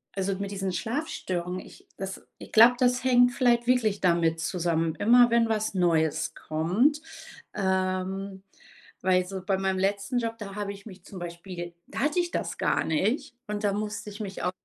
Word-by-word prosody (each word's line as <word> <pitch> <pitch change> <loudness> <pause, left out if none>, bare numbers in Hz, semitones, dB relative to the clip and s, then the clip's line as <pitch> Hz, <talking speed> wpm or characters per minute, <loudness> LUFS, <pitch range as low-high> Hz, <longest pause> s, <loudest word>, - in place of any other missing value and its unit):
also, 195 0 -1
mit 200 0 -4
diesen 195 -1 -2
Schlafstörungen, 185 - -3
ich - - -16
das 190 0 -5 0.2
ich - - -11
glaube, 230 +3 +7
das 250 0 +2
hängt 245 -1 +5
vielleicht 240 -2 +2
wirklich 225 -5 +2
damit 170 -2 +2
zusammen. 165 -1 0
Immer 240 +6 +5
wenn 235 -1 +4
was 215 -1 0
Neues 165 -4 +1
kommt. 185 - +1 0.6
Ähm, 190 0 -1 0.6
weil 185 -1 +3
so 190 0 -6
bei 195 -1 +1
meinem 190 0 0
letzten 200 +4 0
Job, 230 -1 -3
da 195 -2 -7
habe 205 -1 -3
ich 200 0 -14
mich 185 -3 -13
zum 190 - -9
Beispiel 175 0 -7
da - - -6
hatte 295 +5 +1
ich 345 -1 -1
das - - -3
gar - - +1
nicht 225 - 0
und 210 0 -4
da 205 - +2
musste 210 +1 -4
ich 205 +1 -10
mich 195 -3 -5
auch 180 - +1
195 Hz, 180 wpm, -27 LUFS, 180-230 Hz, 0.6 s, glaube